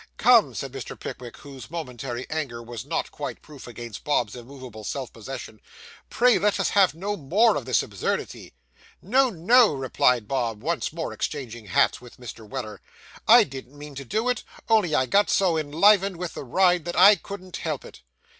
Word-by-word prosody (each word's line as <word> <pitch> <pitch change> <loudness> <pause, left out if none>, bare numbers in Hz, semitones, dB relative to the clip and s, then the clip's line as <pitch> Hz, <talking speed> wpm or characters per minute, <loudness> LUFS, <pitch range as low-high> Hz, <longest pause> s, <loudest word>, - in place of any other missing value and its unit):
'Come,' 235 -2 +5
said 135 -2 -5
Mr. 135 -1 -8
Pickwick, 125 -2 -8
whose 135 -5 -11
momentary 125 -6 -5
anger 135 -7 -4
was 115 -2 -8
not - - -2
quite - - -7
proof 145 -5 -12
against 120 -2 -9
Bob's 125 -7 0
immovable 125 -3 -10
self 130 +4 -5
possession, 115 -2 -9 0.5
'pray 245 0 +3
let 205 0 +1
us - - 0
have 190 -6 +4
no 200 +5 -3
more 200 +8 +3
of 135 - -3
this 130 -2 +2
absurdity.' 100 -3 -4 0.5
'No, 255 +7 +2
no,' 230 +5 +4
replied 125 -3 +1
Bob, 115 -5 -2
once 170 +2 -1
more 165 +1 -5
exchanging 120 -7 -5
hats 95 - +2
with 125 -1 -14
Mr. 115 -3 -10
Weller; 110 -7 -6 0.5
'I 235 +1 +8
didn't 135 -2 -10
mean 145 0 -10
to 140 0 -7
do 220 - -2
it, 250 - -1 0.3
only 205 -9 +3
I 130 - +2
got 200 +11 +2
so 185 -4 +2
enlivened 180 +5 +3
with 180 -1 -5
the - - -7
ride 180 +5 +3
that 175 - -4
I 195 +4 +8
couldn't 185 0 -8
help 155 -4 -4
it. - - -13
145 Hz, 180 wpm, -25 LUFS, 125-190 Hz, 0.5 s, I